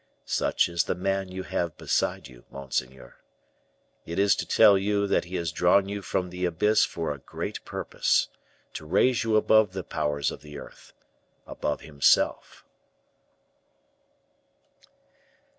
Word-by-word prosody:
Such - - +1
is 85 -1 0
the - - -1
man 95 +1 -2
you 95 0 -5
have 85 -4 -3
beside - - -1
you, - - -16
monseigneur. 65 -2 -5 0.9
It 85 - -7
is 100 0 +4
to - - -4
tell 100 - +6
you 100 +1 +1
that 100 - +1
he 90 +2 -7
has 85 -3 -2
drawn 90 +5 +3
you 100 0 -4
from 90 -1 -2
the 90 0 -6
abyss 105 +6 +2
for 80 -3 -4
a 70 - -11
great - - -6
purpose, - - 0 0.5
to 80 - -8
raise 120 +9 +2
you 110 -1 +1
above 110 -2 +4
the 95 -1 -4
powers 70 -3 -2
of - - -9
the 75 -1 -10
earth - - -13 0.5
above 75 - -4
himself." 70 -3 +1
90 Hz, 140 wpm, -26 LUFS, 75-100 Hz, 0.9 s, tell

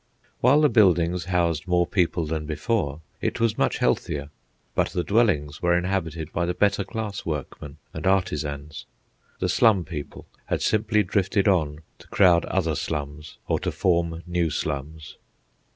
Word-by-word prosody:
While 140 +5 +5
the 150 - +6
buildings 90 -6 +3
housed 85 -4 0
more 90 -1 +3
people 90 -2 0
than 75 0 -3
before, 80 -2 -1 0.2
it - - -2
was 115 -1 +2
much - - +1
healthier. 70 0 -1 0.4
But - - +1
the 90 - -2
dwellings 90 -10 +1
were 85 0 +3
inhabited 85 -4 -2
by 85 +1 0
the 90 - -1
better 100 0 +2
class 105 0 -5
workmen 75 -1 -6 0.2
and - - -3
artisans. 75 -6 -1 0.5
The 90 - -1
slum 95 0 +3
people 75 -4 -7 0.2
had - - -1
simply 110 0 +2
drifted 95 +1 +1
on 80 -6 +1 0.2
to - - -16
crowd 90 -4 +4
other 85 -4 0
slums 75 0 -5
or - - +1
to - - -2
form 85 -2 0
new 85 -2 0
slums. 75 +1 -5
85 Hz, 150 wpm, -24 LUFS, 75-95 Hz, 0.5 s, the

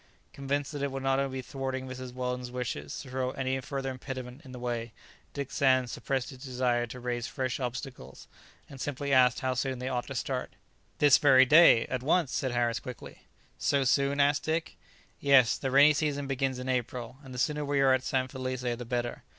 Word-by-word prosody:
Convinced 140 +1 -2
that 145 -2 -5
it 140 -1 -1
would 135 0 -5
only 135 +1 +1
be - - -3
thwarting 130 -1 -4
Mrs. 130 0 -7
Weldon's 125 0 -3
wishes 120 - -4
to 130 - -12
throw 130 0 -1
any 130 0 -2
further 135 0 -4
impediment 130 0 -7
in 130 - -12
the 125 - -8
way, 120 -2 -4 0.4
Dick 140 -2 -4
Sands 130 -3 +2
suppressed 135 -2 -2
his 130 0 -12
desire 125 -2 0
to 125 +2 -9
raise 120 -1 -3
fresh 130 -2 -3
obstacles, 125 - -6 0.4
and 135 -2 -10
simply 140 0 -2
asked 125 -1 +4
how 130 -1 0
soon 130 +1 -2
they 125 +1 -4
ought 125 -2 -2
to 135 - -6
start. 130 0 -3 0.4
"This 145 -2 +6
very 130 -2 +6
day, 150 -4 +7
at 130 -1 -3
once," 155 +1 +2
said 130 - -1
Harris 120 -1 0
quickly. 125 -2 -10 0.3
"So 140 -1 +2
soon?" 140 +2 +2
asked 145 +1 +3
Dick. 160 +1 -2 0.4
"Yes. 140 -4 +5
The 135 - -3
rainy 140 +3 +6
season 145 -2 -1
begins 135 -1 -1
in 125 +1 -6
April, 125 0 -3
and 135 - -11
the 125 - -7
sooner 150 +4 0
we 145 -1 0
are 135 -1 +5
at 130 - +2
San 130 0 -1
Felice 130 -1 -4
the 120 -1 -2
better. 120 0 -3
130 Hz, 200 wpm, -29 LUFS, 125-140 Hz, 0.4 s, day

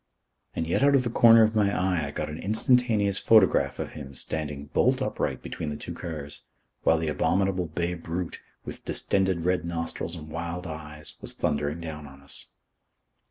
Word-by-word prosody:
And 80 - -1
yet 85 - 0
out 140 0 +5
of 130 - +4
the 120 - -2
corner 115 -2 +7
of 110 0 +3
my 105 -2 +4
eye 90 -5 +1
I - - -4
got 75 +1 -3
an 75 +1 -6
instantaneous 110 -2 +2
photograph 110 -4 +4
of - - -4
him 70 -3 -9
standing 75 0 -3
bolt - - +3
upright - - -2
between 80 - -4
the 75 - -3
two - - -6
cars, 75 -4 -6 0.4
while 80 - +4
the 80 0 -2
abominable 95 +3 +1
bay 85 +3 -2
brute, 85 +1 -4 0.3
with - - -8
distended 95 -4 0
red 90 0 +2
nostrils 85 0 -3
and 80 -2 -9
wild 85 +2 -4
eyes, 75 -2 -8
was - - -7
thundering 75 +3 -1
down 75 -2 -6
on 70 0 -14
us. 70 - -8
85 Hz, 180 wpm, -27 LUFS, 75-95 Hz, 0.4 s, corner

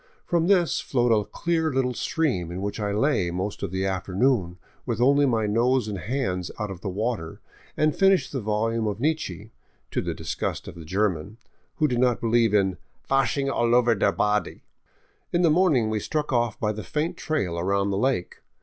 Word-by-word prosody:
From 170 -1 +1
this 180 -4 +3
flowed 120 -2 +1
a 105 - +1
clear 165 -2 0
little 130 -1 0
stream 120 - -1
in 90 - -5
which 100 +2 -4
I 105 -1 -1
lay 105 -4 +1
most 95 +4 -4
of - - -2
the 95 +2 -2
afternoon 95 +1 0 0.3
with 120 -3 -3
only 140 +3 +4
my 115 -4 +1
nose 120 +3 +2
and 100 -3 -4
hands 90 - -2
out 105 -3 -3
of 90 -2 -9
water 100 -3 -3 0.4
and 155 0 +2
finished 195 -8 +3
the 135 - -3
volume 110 +1 0
of 105 0 -3
Nietzsche, 115 - -2 0.4
to - - 0
the - - -3
disgust - - -4
of - - -7
the 85 -2 -11
German, 95 +2 -1 0.4
who 155 - +2
did 125 -3 -1
not 125 -2 +2
believe 115 -1 +2
in 95 -3 +2
" - - -39
vashing 135 +1 +2
all 120 -3 +2
over 120 -1 +4
der 105 - +2
body." 105 0 -1 0.7
In 175 +1 +2
the 165 - +5
morning 150 -10 +3
we 110 - 0
struck 150 +4 -2
off 120 -3 0
by 105 -3 0
the 110 0 -5
faint 155 +3 -2
trail 95 - -2
around 100 +3 0
the 95 - -1
lake. 130 -7 -1
115 Hz, 195 wpm, -25 LUFS, 100-135 Hz, 0.7 s, the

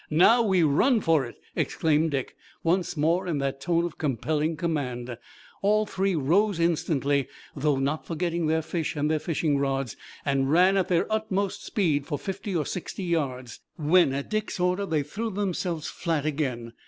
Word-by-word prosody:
"Now 185 +10 +5
we 190 -6 +3
run 220 - +4
for 160 -8 +2
it!" 120 - -10 0.2
exclaimed 160 0 +1
Dick, 135 -3 -3 0.3
once 175 0 0
more 170 +5 +1
in 165 -4 0
that 135 -1 -2
tone 170 -1 +1
of 170 - -7
compelling 150 +3 -1
command. 125 -8 -2 0.5
All 215 +2 +3
three 195 -2 0
rose 175 +6 +2
instantly, 145 -5 +1 0.3
though 145 -1 +1
not 140 +3 -1
forgetting 170 0 -1
their 160 +1 +1
fish 160 0 -3
and 150 +1 0
their 155 - +1
fishing 150 -3 0
rods, 135 -4 -1 0.3
and 135 -1 +1
ran 180 +5 +5
at 190 -2 +2
their 175 -2 +2
utmost 200 -2 -1
speed 150 -9 0
for 145 - -2
fifty 195 +3 -5
or 155 -4 0
sixty 190 +1 -5
yards, 130 -8 -2 0.2
when 160 -1 +4
at 140 +6 -4
Dick's 215 -3 -2
order 180 +2 +1
they 155 -4 +1
threw 215 +11 -4
themselves 185 -5 -2
flat 160 -4 -2
again. 130 -6 -2
160 Hz, 170 wpm, -26 LUFS, 145-185 Hz, 0.5 s, Now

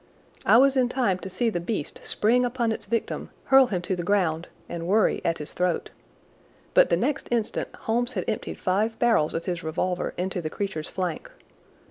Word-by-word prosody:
I - - +7
was 275 +2 +5
in 255 -2 +3
time 225 -9 +1
to 190 - -6
see 230 +4 0
the 175 - -1
beast 170 -3 -4
spring 240 +4 +3
upon 240 -2 0
its 220 - -4
victim, 230 -1 -2
hurl 270 -1 +6
him 180 -6 -2
to 185 - -1
the 175 - -3
ground, 175 -3 +1 0.2
and 170 -1 -5
worry 210 +3 +3
at 165 - 0
his 150 - -6
throat. 180 -2 -1 0.8
But - - +6
the 170 - +3
next 270 - -1
instant 230 -3 -1
Holmes 240 +2 0
had 185 -6 -2
emptied 215 - -3
five 210 +5 0
barrels 225 -11 +2
of 165 - -3
his 175 -2 -2
revolver 175 +3 -2
into 180 0 -2
the 155 - -3
creature's 195 -4 -4
flank. 180 -4 -3
195 Hz, 190 wpm, -26 LUFS, 175-235 Hz, 0.8 s, I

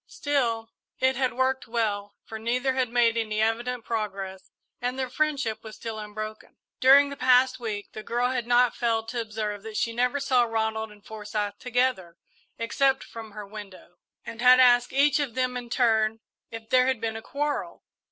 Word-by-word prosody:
Still, 235 -6 -1 0.3
it 260 0 +2
had 255 -1 0
worked 260 +1 0
well, 210 -3 -2
for 220 - -7
neither 250 +4 0
had 260 -2 0
made 235 -1 +3
any 215 -2 -1
evident 230 +2 -1
progress 195 -4 -4 0.3
and 250 +1 -2
their 260 -2 -3
friendship 280 -7 -1
was 220 -1 -9
still 225 -1 -6
unbroken. 215 +1 -7 0.2
During 280 +2 +6
the - - -5
past 255 0 +4
week 215 -4 -5
the 215 - -6
girl 240 +3 0
had 245 -3 -2
not 245 0 +4
failed 225 -2 0
to 240 0 -2
observe 215 -2 -4
that 220 0 -7
she 230 - 0
never 250 +4 +1
saw 265 -3 +3
Ronald 220 -1 -2
and 205 -1 -18
Forsyth 210 -1 -4
together, 245 -9 -1 0.4
except 265 +4 +1
from 225 -2 -10
her 210 -1 -7
window, 200 -4 -11 0.3
and 230 - -7
had 250 +1 +7
asked 245 -1 +5
each 285 +2 +3
of 275 -6 -2
them 255 -1 0
in 245 -1 -6
turn 225 -3 +2 0.3
if 225 -1 -9
there 255 0 +5
had 260 -3 +1
been 225 -1 -3
a 225 - -5
quarrel. 290 +4 -3
230 Hz, 180 wpm, -26 LUFS, 220-255 Hz, 0.4 s, had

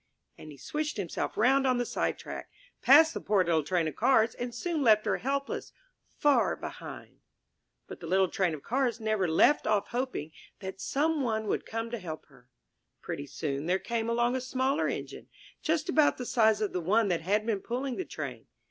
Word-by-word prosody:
'* - - -47
And 155 - -10
he 145 - -12
switched 300 - -3
himself 190 -5 -3
round 265 +5 +4
on 255 -1 +2
the 245 - 0
sidetrack, - - -3 0.3
passed 315 +4 +7
the - - -5
poor 200 -3 +2
little 165 -2 +2
Train 165 +1 0
of 155 - -5
Cars, 230 -2 +3
and 245 0 -5
soon 310 +7 -2
left 215 -4 +5
her - - +1
helpless, 275 +1 -3 0.4
far 290 -1 +3
behind! - - -9 0.7
But - - -10
the 165 - -8
little 190 +2 +3
Train 175 -2 0
of 145 - -12
Cars 250 -1 0
never 215 -4 0
left 165 - +4
off 210 -2 +1
hoping 245 - -3 0.3
that 190 0 -7
some 310 +2 0
one 220 -4 -1
would - - -2
come 225 +1 -4
to 235 - -3
help 160 -4 -7
her. 130 -3 -21 0.5
Pretty 140 - -5
soon 140 +1 -3
there 185 +2 +3
came 230 +2 -2
along 240 +1 +1
a 260 - -1
smaller 260 +2 0
Engine, - - -5 0.3
just 315 0 0
about 310 -4 +3
the 250 - -5
size 220 -3 +3
of 210 - -1
the 180 - -1
one 210 +6 +2
that 175 -3 0
had 205 +5 +1
been 220 -3 0
pulling 255 +5 -3
the 375 - -2
Train. - - -7
225 Hz, 200 wpm, -29 LUFS, 185-260 Hz, 0.7 s, passed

